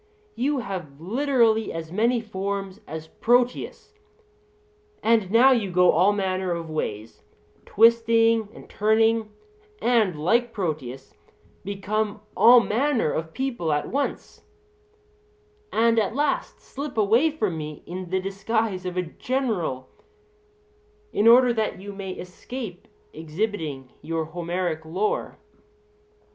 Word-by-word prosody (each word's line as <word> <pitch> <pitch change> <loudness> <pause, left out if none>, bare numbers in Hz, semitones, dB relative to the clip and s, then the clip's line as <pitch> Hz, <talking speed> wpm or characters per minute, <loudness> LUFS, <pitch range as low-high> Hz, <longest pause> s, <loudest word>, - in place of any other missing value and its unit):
You 275 -2 0
have 175 -10 -7
literally 230 - +1
as 165 -1 -6
many 230 +5 +1
forms 200 -1 -4
as 160 +1 -6
Proteus; 245 - 0 1.1
and 220 -4 +3
now 240 +6 +6
you 225 -6 +1
go 180 0 +4
all 185 +6 +4
manner 190 -2 -1
of 165 -2 -5
ways, 110 -7 -4 0.5
twisting 230 0 +4
and - - -13
turning, 220 +1 +2 0.5
and, 220 -9 +2
like 235 +9 +1
Proteus, 145 - -4 0.5
become 205 +2 -2
all 240 +1 +8
manner 240 - +1
of 160 0 -3
people 240 -12 -2
at 150 0 -1
once, 280 +2 -3 1.3
and 230 0 +3
at 220 +2 -1
last 290 0 -1
slip 280 -2 -7
away 225 +9 +4
from 215 - -2
me 150 -1 -7
in 180 0 -7
the 190 +1 0
disguise 195 0 -2
of 180 0 -5
a 180 - +1
general, 180 - -2 1.3
in 210 - +2
order 245 +1 +7
that 220 -4 -2
you 200 +1 -8
may 195 -1 -6
escape 185 +2 -8 0.3
exhibiting 160 -5 -4
your 160 +1 -2
Homeric 170 0 -3
lore. 185 +7 -2
200 Hz, 120 wpm, -24 LUFS, 175-230 Hz, 1.3 s, all